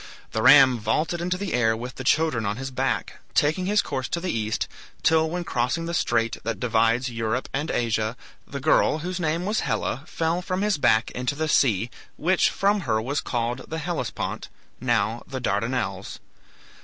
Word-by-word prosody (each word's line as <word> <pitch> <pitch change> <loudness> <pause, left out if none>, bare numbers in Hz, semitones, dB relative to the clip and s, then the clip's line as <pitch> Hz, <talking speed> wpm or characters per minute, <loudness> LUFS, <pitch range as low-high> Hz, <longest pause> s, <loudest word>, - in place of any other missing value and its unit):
The 110 - -1
ram 130 -1 +7
vaulted 155 +11 0
into 180 +1 -1
the 195 -1 -3
air 110 -2 +2
with 125 +2 -6
the 130 - -7
children 155 -3 +2
on 105 +1 -2
his 135 +1 -5
back, 130 -4 -2 0.2
taking 160 +5 +2
his 210 +1 +3
course 130 -1 -3
to 170 - -2
the 180 0 -2
East, 110 -1 -1 0.4
till 160 0 +4
when 175 +2 -3
crossing 135 +4 -1
the 170 - -4
strait 115 -8 +1
that 115 -1 -3
divides 115 +1 +2
Europe 115 +2 -2
and 150 +4 -2
Asia, 110 -1 0 0.3
the 140 - -5
girl, 155 +2 +3
whose 185 0 -3
name 165 +1 -1
was 215 +2 0
Helle, 125 +1 -1
fell 165 +2 -1
from 185 +1 -2
his 210 -7 +1
back 120 -3 +3
into 125 +3 -2
the 160 +2 -1
sea, 120 -6 +2 0.3
which 180 +4 +3
from 200 +1 +1
her 110 -1 +3
was 135 +6 -2
called 120 +1 -3
the 160 - -3
Hellespont, 160 -7 -3 0.3
now 115 -2 0
the 130 - -4
Dardanelles. 115 +2 -2
130 Hz, 180 wpm, -25 LUFS, 115-160 Hz, 0.4 s, ram